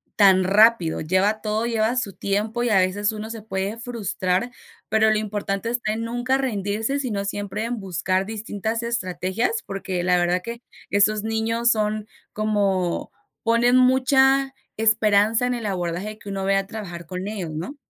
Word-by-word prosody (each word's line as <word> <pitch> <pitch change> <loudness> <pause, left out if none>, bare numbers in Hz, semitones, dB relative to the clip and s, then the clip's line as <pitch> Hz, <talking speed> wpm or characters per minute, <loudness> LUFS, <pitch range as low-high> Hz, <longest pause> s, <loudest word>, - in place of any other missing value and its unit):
tan 190 -2 +5
rápido, 200 -3 +4
lleva 190 +6 +1
todo, 215 +1 -1
lleva 230 +1 0
su 225 -6 -1
tiempo 215 +5 -1
y 245 - +1
a 215 - +4
veces 200 +3 +1
uno 215 0 -6
se 225 -1 -6
puede 195 0 -3
frustrar, 230 -3 -2 0.4
pero 220 0 +3
lo 215 - +2
importante 205 0 -3
está 235 -2 -1
en 225 +1 -3
nunca 245 +3 0
rendirse, 225 +1 -1
sino 210 -7 -2
siempre 205 +1 -3
en 235 -2 -3
buscar 185 +1 -1
distintas 220 +1 -3
estrategias, 225 - -1
porque 190 -2 -3
la 180 0 +3
verdad 175 +1 +1
que 235 +4 -7 0.3
esos 205 +1 +3
niños 225 +1 +1
son 215 -1 -1 0.2
como 200 -4 0 0.3
ponen 235 +2 +3
mucha 265 +1 +4 0.2
esperanza 220 +1 +3
en 250 - 0
el 235 -2 -4
abordaje 185 +2 -3
que 205 - -10
uno 195 -1 -3
vaya 195 0 +3
a 195 - -5
trabajar 180 -6 -7
con 185 +3 -5
ellos, 195 -6 -4
¿no? 165 - -5
215 Hz, 165 wpm, -23 LUFS, 195-230 Hz, 0.4 s, tan